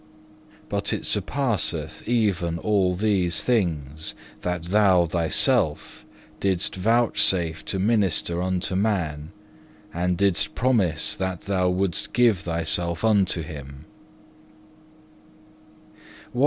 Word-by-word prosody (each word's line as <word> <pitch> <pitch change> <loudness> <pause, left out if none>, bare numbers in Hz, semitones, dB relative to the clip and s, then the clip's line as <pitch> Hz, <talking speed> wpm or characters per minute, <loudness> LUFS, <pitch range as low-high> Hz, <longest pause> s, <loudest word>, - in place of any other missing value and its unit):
But - - -1
it - - -3
surpasseth 120 - -1
even 95 -8 0
all 95 -2 +1
these 95 -3 +1
things, 80 - -1 0.3
that 90 -1 -3
Thou 95 -1 +3
Thyself 80 -2 0 0.3
didst 95 -2 -1
vouchsafe 95 -6 +1
to 95 - -2
minister 95 -4 +1
unto 95 0 -1
man, 85 -8 -1 0.6
and 90 +1 -1
didst 95 -5 +1
promise 100 -9 +1
that 95 -2 -3
Thou 95 -2 0
wouldest 90 -2 -1
give 120 -6 +3
Thyself 85 0 -1
unto 100 -6 +2
him. 70 -1 -10
90 Hz, 95 wpm, -24 LUFS, 85-100 Hz, 0.6 s, Thou